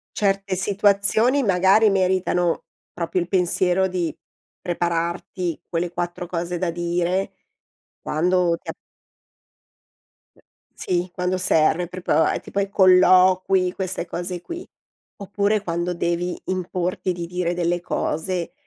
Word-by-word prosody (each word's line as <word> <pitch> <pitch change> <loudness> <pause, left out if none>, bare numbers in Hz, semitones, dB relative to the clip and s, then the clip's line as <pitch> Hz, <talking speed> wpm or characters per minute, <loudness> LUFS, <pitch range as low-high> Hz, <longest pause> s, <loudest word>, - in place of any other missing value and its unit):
Certe 195 -1 0
situazioni 205 +6 +2
magari 195 0 +4
meritano 185 -2 +1 0.3
proprio 175 +1 -2
il 175 - -2
pensiero 185 0 +2
di 180 -3 -2 0.5
prepararti 170 0 -2
quelle 170 +1 -2
4 175 0 -4
cose 175 0 -3
da 180 -1 0
dire 175 +3 -1 0.7
quando 175 +2 +1
ti - - -10
a - - -3 1.6
E - - -25 0.3
sì, 180 0 -2
quando 180 +1 -1
serve, 175 -1 +2
proprio 175 -2 +1
è - - 0
tipo 200 - -4
ai 200 0 -1
colloqui 185 -1 +4
queste 185 -2 -3
cose 175 +1 -5
qui. 340 - -8 0.5
Oppure 205 +1 0
quando 175 -1 -2
devi 175 +1 -2
importi 185 0 -2
di 170 -1 -5
dire 180 0 -2
delle 175 0 0
cose, 175 +3 -2
180 Hz, 120 wpm, -22 LUFS, 175-190 Hz, 1.6 s, magari